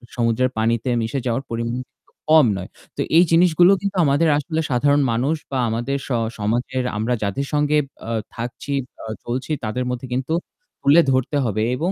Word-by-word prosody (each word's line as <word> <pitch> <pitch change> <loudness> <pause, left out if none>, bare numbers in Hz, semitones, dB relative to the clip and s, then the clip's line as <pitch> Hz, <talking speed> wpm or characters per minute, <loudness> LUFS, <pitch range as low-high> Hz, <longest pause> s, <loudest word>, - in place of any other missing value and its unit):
সমুদ্রের 120 +2 +1
পানিতে 115 +2 0
মিশে 115 +5 -2
যাওয়ার 120 +2 -1
পরিমাণ 115 +1 -2
কিন্তু 135 - -37 0.2
কম 155 -4 +7
নয়। 90 - -7 0.3
তো - - 0 0.2
এই 175 - +8
জিনিসগুলো 175 +2 +5
কিন্তু 200 -1 -3
আমাদের 145 +3 +3
আসলে 160 +2 -2
সাধারণ 145 +3 +3
মানুষ 130 +7 +1 0.2
বা 130 - -1
আমাদের 120 +5 -1
স - - -12 0.3
সমাজের 125 +5 -1
আমরা 110 +4 0
যাদের 120 +8 -2
সঙ্গে 150 0 +2 0.3
আ - - -2 0.2
থাকছি, 120 +4 -5 0.3
অ - - -7 0.2
চলছি 130 +5 -3
তাদের 110 +4 -2
মধ্যে 125 +1 -4
কিন্তু 130 +5 -1 0.5
তুলে 155 +5 +6
ধরতে 130 +3 +1
হবে 110 -1 0
এবং 170 +6 0
130 Hz, 170 wpm, -21 LUFS, 115-145 Hz, 0.5 s, এই